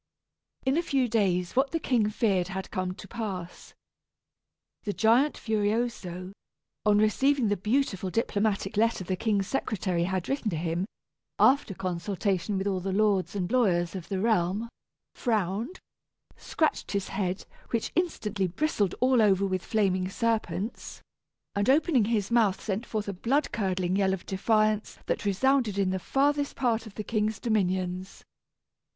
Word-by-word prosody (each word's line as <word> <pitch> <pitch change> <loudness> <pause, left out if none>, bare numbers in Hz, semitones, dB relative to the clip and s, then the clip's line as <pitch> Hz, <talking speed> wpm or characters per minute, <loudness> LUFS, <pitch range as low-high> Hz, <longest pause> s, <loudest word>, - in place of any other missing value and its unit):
In 265 +3 +2
a - - +3
few 275 -6 +1
days 190 -5 +1
what 270 +2 +3
the 330 - -1
king 235 -8 +1
feared 200 -5 +1
had 190 0 -5
come 185 -2 -2
to 195 - -11
pass. 190 -5 -6 1.1
The 205 - -3
giant 235 +8 +3
Furioso, 210 -4 -1 0.6
on 205 -1 +5
receiving 240 +3 +3
the 205 - +2
beautiful 210 -2 0
diplomatic 205 -1 0
letter 225 -3 +2
the 185 +1 -2
king's 205 -1 0
secretary 185 -8 -1
had 185 -1 -2
written 270 -5 -1
him 170 +2 -2 0.5
(after 260 -7 +4
consultation 190 +1 -1
with 190 - -2
all 195 -2 0
the 190 +1 -3
lords 200 -1 +1
and 185 0 -2
lawyers 175 -9 +2
of 180 -3 -7
the 195 -2 -1
realm), 215 +1 +1 0.4
frowned, 220 - -1 0.6
scratched 315 -8 -1
his 200 -1 -1
head, 190 -1 -2 0.2
which 230 -2 -1
instantly 210 - -1
bristled 205 - 0
all 255 -2 +4
over 200 -2 +4
with 185 -1 -1
flaming 185 -4 +1
serpents, 220 -2 -2 0.5
and 200 +3 0
opening 275 - +4
his 215 -2 0
mouth 220 -5 +3
sent 215 +3 -3
forth 215 -2 -3
a 200 - -2
blood 265 +10 0
curdling 185 -4 0
yell 190 -1 +2
of 185 - -13
defiance 215 +2 +1
that - - -2
resounded 225 +1 +2
in 195 -2 +2
the 190 - -1
farthest 285 +6 +1
part 230 -3 0
of 205 - -13
the 215 - -4
king's 215 -1 -1
dominions. 185 -4 -1
205 Hz, 150 wpm, -28 LUFS, 185-230 Hz, 1.1 s, on